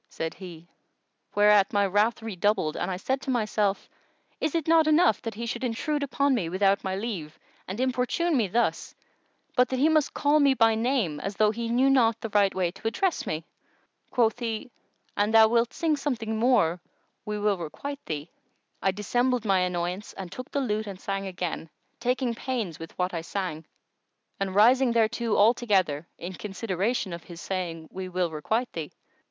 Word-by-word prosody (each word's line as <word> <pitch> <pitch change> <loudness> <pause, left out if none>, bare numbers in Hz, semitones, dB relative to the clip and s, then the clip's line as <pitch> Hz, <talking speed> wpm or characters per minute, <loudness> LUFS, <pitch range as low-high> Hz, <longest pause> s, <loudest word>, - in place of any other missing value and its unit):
[FN#120] - - -24
said 160 0 -3
he; 170 -3 -11 0.7
whereat 205 -1 +5
my 205 -1 +3
wrath 210 +4 +1
redoubled 205 -6 0
and - - -2
I 185 - -2
said 260 +8 -2
to - - -6
myself, 215 -4 0 0.5
"Is 315 - -1
it 330 -2 -1
not 325 -1 +5
enough 310 - +4
that 225 -2 -5
he 235 +2 -4
should 235 +2 -4
intrude 290 +5 -1
upon 280 0 +1
me, 190 -10 0
without 195 +2 +2
my 190 0 -2
leave, 190 -8 -5 0.3
and 190 +5 -5
importune 260 +6 +1
me 230 -6 +2
thus, 235 +6 -1 0.6
but 250 -1 +4
he 265 +4 +2
must 310 -3 +2
call 295 +1 +3
me 280 -2 +4
by 225 -2 +4
name, 220 - 0
as 195 +4 -4
though 215 0 +3
he 230 +1 -4
knew 250 +3 +3
not 230 -4 +4
the 225 - -5
right 205 -1 +3
way 180 -2 0
to 195 +4 -6
address 345 +11 0
me?" 155 +1 -3 0.6
Quoth 235 -1 +2
he, 230 +1 -4 0.4
"An 205 +1 +2
thou 220 0 +7
wilt 235 +1 +2
sing 320 -2 0
something 240 -6 -2
more 200 -9 +3 0.4
we 210 0 -3
will 205 -2 +1
requite 280 - -6
thee." 150 +1 -4 0.5
I - - +2
dissembled 240 +5 0
my 195 -2 +3
annoyance 180 +2 -2
and 185 -3 -8
took 255 +6 -7
the 280 - -1
lute 215 -4 -1
and 195 -2 -7
sang 195 0 -3
again, 180 -3 -4 0.3
taking 250 0 0
pains 230 -8 -3
with 165 0 -10
what 180 0 -1
I 165 - -2
sang 165 -3 -4 0.7
and 195 -1 -2
rising 245 +4 +5
thereto 230 0 +1
altogether, 200 -8 +2
in 175 +2 -6
consideration 200 +1 -2
of 170 -1 -8
his 170 -1 -10
saying, 170 -4 -4
"We 185 0 -6
will 180 -2 -1
requite 220 +11 -2
thee." 160 -3 -5
215 Hz, 180 wpm, -27 LUFS, 185-245 Hz, 0.7 s, thou